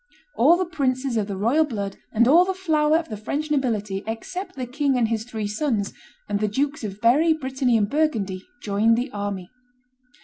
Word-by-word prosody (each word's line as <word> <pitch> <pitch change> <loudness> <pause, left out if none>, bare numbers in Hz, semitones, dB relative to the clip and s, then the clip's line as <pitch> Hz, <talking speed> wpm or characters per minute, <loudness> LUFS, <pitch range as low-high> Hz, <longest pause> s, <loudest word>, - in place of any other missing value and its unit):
All 315 +8 +5
the 370 - 0
princes 270 -6 -1
of 210 -3 0
the 200 -2 -4
royal 240 +11 +3
blood 205 -9 -4
and 235 +2 +3
all 330 +7 +7
the 380 +1 -2
flower 315 -4 +2
of 330 -1 -4
the 215 - -5
French 290 +8 -3
nobility, 215 -8 -1
except 360 - -5
the 255 -2 -4
king 270 +1 0
and 230 -3 +2
his 225 -1 -1
three 220 -3 -4
sons, 210 -1 -1 0.3
and 205 -1 -1
the 215 - +1
Dukes 280 +6 -1
of 200 -1 -5
Berry, 285 +9 +4
Brittany, 260 -5 0
and 205 -2 +1
Burgundy, 215 -10 -1 0.2
joined 215 +3 +3
the 250 +2 -2
army. 200 -3 -4
245 Hz, 195 wpm, -23 LUFS, 210-300 Hz, 0.3 s, all